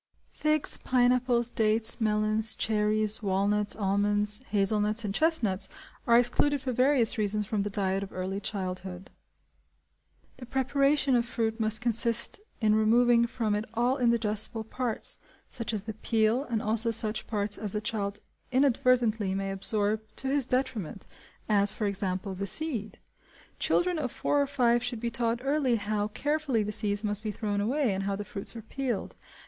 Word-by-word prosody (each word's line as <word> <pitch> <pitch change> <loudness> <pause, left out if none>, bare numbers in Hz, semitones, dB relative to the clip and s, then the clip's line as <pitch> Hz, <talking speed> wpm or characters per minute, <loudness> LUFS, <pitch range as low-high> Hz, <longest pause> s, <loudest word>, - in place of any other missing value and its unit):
Figs, 305 -1 +2
pineapples, 245 -1 +2
dates, 220 +1 +2
melons, 215 0 +1
cherries, 215 0 0
walnuts, 205 +1 0
almonds, 205 +2 +1
hazelnuts, 210 +2 +1
and 195 - -2
chestnuts, 225 - +1 0.4
are 235 0 +6
excluded 260 +4 +2
for 260 -1 -3
various 250 -2 +2
reasons 210 0 0
from 205 +1 -1
the 205 - -2
diet 195 -1 -1
of 200 - -7
early 185 +2 -4
childhood. 185 -2 -5 1.3
The 250 -2 -10
preparation 275 +1 +1
of 240 - +3
fruit 225 -1 -2
must 220 0 +1
consist 235 - +3 0.2
in 215 -2 +3
removing 235 +2 +4
from 230 -3 -2
it 210 +1 -1
all 245 +3 +1
indigestible 225 -2 0
parts, 235 +1 -3 0.3
such 230 -3 -3
as 210 -3 -2
the 220 0 -6
peel, 220 +4 0
and 230 -5 -2
also 225 +2 +2
such 220 -1 0
parts 205 -1 -1
as 210 -3 -4
the 210 - -1
child 210 -1 -3 0.3
inadvertently 250 -6 +2
may 195 0 -2
absorb 205 +2 0
to 265 - -2
his 275 -2 +2
detriment, 250 - -2 0.4
as, 205 -2 +2
for 215 - -3
example, 190 -1 -2
the 200 +2 -4
seed. 250 -6 -2 0.6
Children 355 -2 +1
of 255 -5 -3
four 290 - 0
or 280 - 0
five 240 -4 +2
should 245 -2 -3
be 235 +1 -3
taught 235 0 -1
early 275 -3 +1
how 210 -1 -1
carefully 285 0 -1
the 210 - -3
seeds 205 -1 +1
must 205 -1 -1
be 220 - -4
thrown 205 0 -2
away 250 +1 0
and 195 +1 -3
how 200 0 -1
the 205 +1 -6
fruits 195 +3 -2
are 225 - -8
peeled. 250 -1 -4
220 Hz, 160 wpm, -28 LUFS, 205-245 Hz, 1.3 s, are